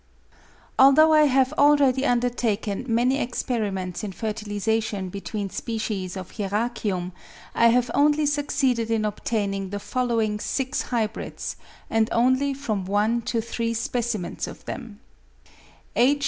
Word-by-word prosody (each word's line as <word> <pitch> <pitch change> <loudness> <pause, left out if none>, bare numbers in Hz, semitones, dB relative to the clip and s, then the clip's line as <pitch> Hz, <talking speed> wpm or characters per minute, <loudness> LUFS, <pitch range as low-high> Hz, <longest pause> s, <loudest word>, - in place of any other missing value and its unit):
ALTHOUGH 275 +4 +7
I 305 -1 +6
have 265 0 +3
already 285 -2 +4
undertaken 235 -3 0
many 245 +4 +2
experiments 210 -7 -2
in 205 - -3
fertilisation 210 -1 -2
between 200 +1 -5
species 210 -5 -3
of 185 -2 -7
Hieracium, 205 -3 -2 0.4
I 235 - +5
have 240 0 +3
only 295 +1 +3
succeeded 275 -5 0
in 225 -1 +1
obtaining 200 -2 -2
the 205 +1 -4
following 225 -3 -1
6 260 +4 -2
hybrids, 225 -3 -3 0.3
and 225 0 +1
only 260 +4 +2
from 215 -9 -3
one 210 +4 +1
to 230 - 0
three 230 0 -2
specimens 230 -4 -2
of - - -11
them: 220 -3 -7 0.9
If. 270 +4 +4
230 Hz, 120 wpm, -24 LUFS, 205-255 Hz, 0.9 s, ALTHOUGH